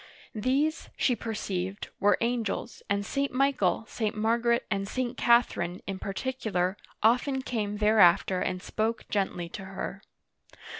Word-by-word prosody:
These, 270 +8 0
she 250 - +2
perceived, 195 -4 -4
were 205 +1 +4
angels, 235 -1 -2
and 200 0 0
St. 275 +5 -1
Michael, 255 -7 +1
St. 215 -1 -2
Margaret, 235 +2 +2
and 195 0 0
St. 250 +2 -2
Catherine, 210 -7 +2
in 195 -1 -4
particular, 195 -4 -2 0.3
often 255 +4 +3
came 210 -5 -2
thereafter 195 -3 +5
and 185 0 -2
spoke 225 +1 -2
gently 190 -4 -1
to 195 +2 -7
her. 195 +1 -6
215 Hz, 130 wpm, -28 LUFS, 195-240 Hz, 0.3 s, thereafter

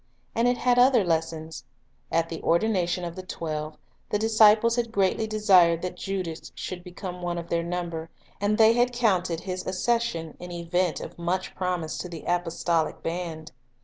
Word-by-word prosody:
And 230 +2 +2
it 245 0 +2
had 245 0 +3
other 250 -3 +6
lessons. 160 -1 -2 0.5
At 165 0 +2
the 165 -1 -6
ordination 180 -1 +1
of 170 -1 -6
the 185 - -5
twelve, 155 -4 -5 0.3
the - - +1
disciples 220 +1 +5
had 235 -2 -1
greatly 200 +1 +1
desired 185 -6 +4
that 180 -1 -3
Judas 180 -4 -4
should 180 -1 -6
become 180 0 -7
one 175 0 -2
of 170 0 -6
their 170 - +1
number; 170 -1 -4 0.3
and 205 +1 +2
they 220 0 +7
had 245 +1 +2
counted 185 -8 +1
his 185 -1 -4
accession 185 -5 -1
an 180 0 -8
event 175 0 -1
of - - -9
much 180 +2 -2
promise 180 -4 -2
to 180 - -5
the 165 -2 -8
apostolic 170 -2 0
band. 165 -2 -4
180 Hz, 170 wpm, -26 LUFS, 170-210 Hz, 0.5 s, they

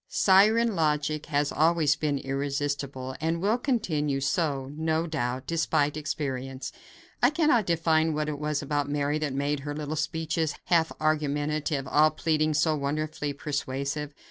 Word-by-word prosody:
Siren 220 - +4
logic 155 -1 0
has 145 -2 0
always 155 -2 +3
been 150 -2 -1
irresistible 140 -1 -3
and 165 +1 0
will 210 +7 +1
continue 155 - 0
so, 140 -2 -1
no 160 +1 0
doubt, 130 -6 -2
despite 150 -3 +1
experience. 135 -3 -4 0.5
I 245 - +6
cannot 300 - +2
define 160 -2 +2
what 150 0 -1
it 150 -2 -3
was 150 -1 -1
about 145 -1 -1
Mary 145 +1 0
that 150 -2 -2
made 140 +2 -1
her 145 +1 -5
little 150 0 -4
speeches, 160 0 -1
half 165 -2 +2
argumentative, 150 -1 0
all 155 +2 +5
pleading, 155 0 0
so 155 +2 +2
wonderfully 150 +1 -2
persuasive. 140 +1 -3
150 Hz, 145 wpm, -27 LUFS, 145-160 Hz, 0.5 s, I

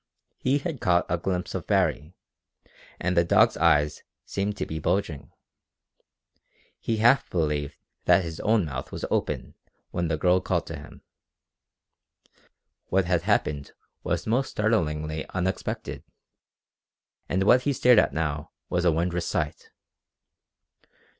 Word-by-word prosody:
He 135 +2 +2
had 145 -3 -5
caught 90 -1 +3
a 90 0 0
glimpse 90 0 -2
of - - -5
Baree, 80 +5 +1 0.8
and 90 +1 0
the 85 - +5
dog's 110 +6 +4
eyes 75 -3 +3 0.2
seemed 100 +1 -2
to - - -2
be 80 - -5
bulging. 75 -5 -1 1.5
He 115 - -1
half 120 +5 +4
believed 75 -4 -1 0.3
that 95 - +5
his 80 -2 -6
own 110 -4 +2
mouth 70 -3 -6
was - - -4
open - - -1 0.4
when 85 -1 -1
the 80 -1 -1
girl 90 +3 +3
called - - -1
to - - -6
him. - - -12 1.8
What 95 0 +2
had 90 -1 +1
happened 70 -2 0 0.3
was - - -2
most 125 +5 +1
startlingly 80 -8 0
unexpected, 95 +1 -3 1.3
and 95 +2 +1
what 125 +5 +5
he 145 - 0
stared 125 -3 +5
at - - +2
now 75 -2 -2 0.2
was 90 0 +1
a 85 - +5
wondrous 85 +2 -1
sight! 75 0 -3
90 Hz, 135 wpm, -26 LUFS, 80-105 Hz, 1.8 s, the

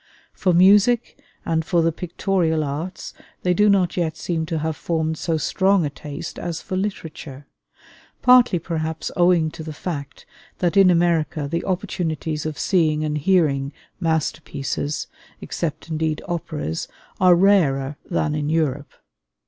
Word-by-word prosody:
For 185 - +1
music 205 +9 +4 0.2
and 160 -1 0
for 170 +1 +1
the 165 - +2
pictorial 170 -1 -1
arts 150 +6 -5 0.3
they 180 - +3
do 210 +4 +4
not 190 -3 +2
yet 165 -3 -1
seem 165 -2 -2
to 165 -1 -2
have 160 0 -2
formed 160 -1 -1
so 160 +1 -1
strong 190 +3 +2
a 145 - -3
taste 145 0 -7
as 170 -2 -4
for 185 - -5
literature; 160 -8 -5 0.8
partly 250 -6 +6
perhaps 160 -1 -3
owing 175 -3 +3
to - - -9
the 160 0 -6
fact 145 -3 -6 0.3
that 175 +1 0
in 195 -2 +7
America 170 -3 +1
the 170 +4 -2
opportunities 165 -5 -2
of 155 -2 -5
seeing 155 -5 +1
and 150 0 -1
hearing 145 -5 +2 0.3
masterpieces, 155 -3 -2 0.3
except 170 -1 -4
indeed 155 -1 -1
operas, 155 - -3 0.3
are 185 -1 +6
rarer 155 -8 +3
than 155 -3 0
in 150 -1 -2
Europe. 150 -3 -1
165 Hz, 140 wpm, -22 LUFS, 155-180 Hz, 0.8 s, in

